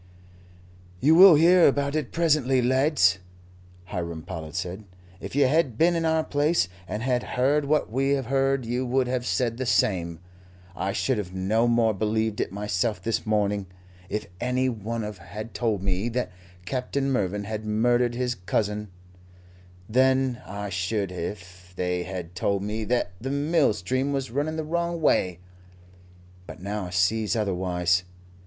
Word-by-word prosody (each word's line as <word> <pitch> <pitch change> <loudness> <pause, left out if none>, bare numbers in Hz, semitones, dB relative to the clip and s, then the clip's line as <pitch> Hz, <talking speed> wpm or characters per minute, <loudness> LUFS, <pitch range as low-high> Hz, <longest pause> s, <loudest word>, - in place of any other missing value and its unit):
"You 150 - +4
will 180 0 +9
hear 170 +3 +6
about 140 +1 +1
it 155 -4 -2
presently, 150 -6 +2
lads," 130 - +3 0.7
Hiram 85 -4 -5
Powlett 80 -2 -7
said. 90 +3 -4 0.3
"If - - -7
you 145 - +4
had 135 -4 +1
been 170 +4 +4
in 165 -1 0
our 160 0 +2
place, 145 - +1 0.2
and 105 +4 -4
had 125 -1 +1 0.2
heard 140 +3 +2
what 150 -5 +1
we 135 +3 +1
have 135 -2 -1
heard, 135 0 +1
you 120 +2 -1
would 130 +1 +1
have 125 -1 -2
said 120 -2 0
the 130 - -3
same. 85 -8 +1 0.6
I 95 +1 -2
should 130 +3 0
have 95 -2 -6
no 110 +5 +1
more 115 -2 +3
believed 110 +1 -1
it - - -2
myself 105 +1 -1
this 110 +3 -2
morning, 105 -2 0 0.4
if 105 - -3
any 125 +2 +1
one 115 0 -4
had 105 +2 -7
told 110 -5 -1
me 95 +4 -1
that 120 -5 -2 0.3
Captain 135 +3 -2
Mervyn 105 -4 -1
had 110 +1 -5
murdered 120 +3 +1
his 125 0 -1
cousin, 105 +1 -2 1.0
than 130 +1 +2
I 100 +1 -5
should 100 +1 -2
if 90 0 -7
they 90 0 -1
had 90 -2 -6
told 100 +2 -1
me 110 +1 -3
that 120 -5 0
the 135 - -3
mill 145 +1 +2
stream 130 +8 -1
was 135 -3 -2
running 145 +5 -1
the 160 - -2
wrong 170 +2 -2
way; 90 - +2 1.1
but - - -9
now 100 +1 -4
I - - -6
sees 100 +5 +1
otherwise. 90 -4 +1
115 Hz, 160 wpm, -25 LUFS, 95-135 Hz, 1.1 s, will